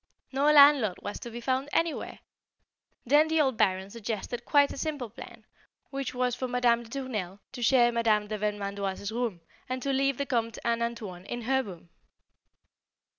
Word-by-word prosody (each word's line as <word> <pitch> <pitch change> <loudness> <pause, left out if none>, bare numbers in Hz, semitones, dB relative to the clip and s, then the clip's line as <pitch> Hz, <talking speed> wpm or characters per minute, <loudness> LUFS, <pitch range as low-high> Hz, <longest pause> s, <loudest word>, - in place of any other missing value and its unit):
No 280 +3 +3
landlord 280 -9 +6
was 205 - -5
to 240 - -7
be 235 +1 -7
found 260 +3 -1
anywhere. 330 -1 -1 0.8
Then 295 +5 +5
the 320 0 +1
old 265 -4 +2
Baron 190 -2 +1
suggested 230 +1 -5
quite 285 -1 +4
a - - -8
simple 290 -8 -3
plan, 240 - -12 0.5
which 275 -2 -4
was 250 0 0
for 255 - -3
Madame 245 -1 +2
de 230 - -13
Tournelle 220 -8 -4
to 255 - -8
share 240 0 +4
Madame 225 -3 +2
de 215 - -3
Vermandoise's 200 -1 -3
room, 230 -7 -2 0.3
and 255 0 -2
to 275 - 0
leave 275 -1 +1
the 280 - -1
Comte 230 -4 -1
and 235 0 +1
"Antoine" 210 -6 -5
in 240 -1 -5
her 265 +3 +2
room. 175 -7 -10
240 Hz, 175 wpm, -28 LUFS, 210-270 Hz, 0.8 s, landlord